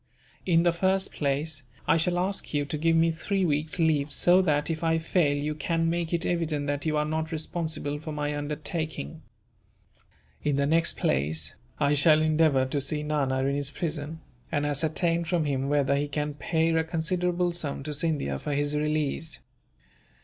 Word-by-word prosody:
In 170 -2 +4
the 175 - +4
first 190 +3 0
place, 145 +1 -1 0.3
I - - +5
shall 175 +2 +1
ask 185 -3 -1
you 145 0 +1
to 150 +2 -3
give 165 +1 +3
me 165 0 +4
three 190 +4 -1
weeks' 155 +1 0
leave 155 -3 +2
so 180 +5 +5
that, 150 -3 +1
if 160 +1 -4
I 165 0 +2
fail, 160 -3 +1
you 150 +1 -2
can 165 +2 0
make 170 -1 -2
it 170 -1 +1
evident 160 -4 -1
that 145 +2 -2
you 155 -1 +1
are 150 - +1
not 160 +1 -2
responsible 160 -2 -2
for 155 +1 -6
my 150 0 -2
undertaking. 150 - -4 1.2
In 145 -1 +1
the 140 0 +1
next 165 +3 +2
place, 75 +3 0 0.3
I 140 - +3
shall 155 +1 +5
endeavour 155 -4 +3
to 140 +2 -2
see 150 +2 -1
Nana 140 -3 0
in 135 +1 +1
his 140 -1 0
prison, 155 +1 -4 0.3
and 145 0 0
ascertain 160 +3 0
from 170 -1 0
him 135 -1 -1
whether 140 -1 +2
he 145 +1 0
can 150 +1 -2
pay 160 +2 0
a 160 0 +2
considerable 175 +2 0
sum 145 -5 -3
to 150 +1 -4
Scindia 145 - -1
for 145 - -3
his 145 +1 0
release. 150 0 -1
155 Hz, 180 wpm, -27 LUFS, 145-165 Hz, 1.2 s, I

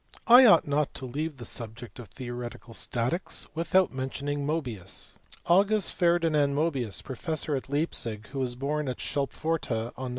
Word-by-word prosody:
I 245 +2 +9
ought 205 - +6
not 145 0 0
to 130 - -4
leave 150 +4 -4
the 120 - -8
subject 115 -2 -5
of 120 - -9
theoretical 120 +1 -7
statics 125 - -1
without 170 +2 +2
mentioning 140 +2 -3
Mobius. 130 - -3 0.3
August 195 +3 +3
Ferdinand 165 -5 +2
Mobius, 140 -9 -1
professor 155 +3 -2
at 135 - -5
Leipzig, 120 -7 -1
who 135 - -5
was 125 -2 -1
born 145 +3 -2
at 125 - -3
Schulpforta 140 -4 -2
on 130 - -5
Nov. - - -4
140 Hz, 155 wpm, -28 LUFS, 120-160 Hz, 0.3 s, I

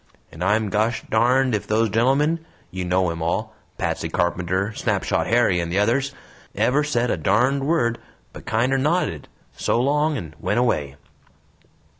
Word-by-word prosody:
And 80 - -6
I'm 105 +2 +1
gosh 110 +3 0
darned 125 +3 +3
ef 105 -1 -2
those 110 +1 +2
GENTLEMEN 140 - +2 0.3
you 95 0 -4
know 90 0 +1
'em 85 0 -6
all 85 +1 -2 0.2
Patsey - - -2
Carpenter, 90 +4 -1
Snapshot - - -1
Harry, 115 -6 +3
and 85 0 -3
the 95 - -1
others 135 +7 +1 0.4
ever 145 +4 +2
said 125 -5 0
a - - 0
darned 125 - +1
word, 120 -8 +1 0.3
but - - -12
kinder 125 +4 +1
nodded 145 - 0 0.3
'So - - 0
long' 150 +3 +1
and 80 - -7
went 105 - -1
away!" 75 - 0
115 Hz, 155 wpm, -22 LUFS, 95-135 Hz, 0.4 s, darned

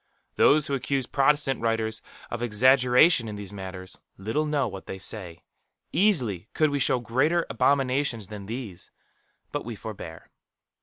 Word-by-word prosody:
Those 150 0 +5
who 140 - -2
accuse 135 -1 -1
Protestant 140 0 +1
writers 110 -1 -1 0.3
of 120 - -4
exaggeration 125 +4 +4
in 105 - -5
these 100 -1 -8
matters, 95 -1 -8 0.2
little 110 +11 -1
know 145 -4 +1
what 95 -2 -8
they 95 - -5
say. 90 -4 -5 0.5
Easily 125 - +1
could 155 -2 +3
we 145 - 0
show 130 - +3
greater 145 +9 +1
abominations 135 -4 +1
than 105 -2 -8
these; 110 -6 -7 0.6
but - - -3
we 115 0 -6
forbear. 95 -6 -9
120 Hz, 145 wpm, -26 LUFS, 105-140 Hz, 0.6 s, Those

